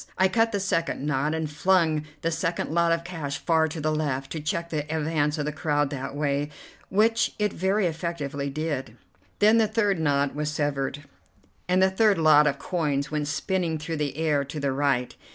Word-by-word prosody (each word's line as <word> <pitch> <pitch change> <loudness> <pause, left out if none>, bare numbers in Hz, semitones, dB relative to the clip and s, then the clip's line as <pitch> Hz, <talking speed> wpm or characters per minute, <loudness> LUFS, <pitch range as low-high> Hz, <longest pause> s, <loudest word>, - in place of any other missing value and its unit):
I 190 0 +4
cut 225 +3 +2
the 205 - -1
second 165 -6 -1
knot, 150 +1 0
and 160 -1 -2
flung 160 0 +2 0.2
the 165 - +1
second 165 -1 -2
lot 170 0 +2
of 165 0 +1
cash 150 -6 -4
far 160 0 +2
to 160 +1 -6
the 155 +1 0
left, 135 -3 -2
to 160 - -3
check 170 +3 -3
the 155 - 0
advance 150 -1 0
of 150 - -2
the 150 - -1
crowd 145 -2 0
that 135 0 -5
way, 145 0 0 0.4
which 225 +3 +2
it 210 -2 0
very 190 +3 +1
effectually 155 -4 -3
did. 140 -5 -4 0.4
Then 215 +2 +5
the 220 - +4
third 205 -4 +1
knot 145 -2 +1
was 150 +1 -2
severed, 145 -2 -2 0.7
and 185 +1 +4
the 190 - +4
third 210 0 +3
lot 155 -2 +6
of 140 -1 0
coins 150 -5 -1
went 150 -1 -1
spinning 165 +2 -1
through 155 +1 -4
the 145 -1 -2
air 150 -3 +1
to 140 +2 -6
the 140 -1 0
right. 135 -2 0
155 Hz, 195 wpm, -26 LUFS, 145-170 Hz, 0.7 s, lot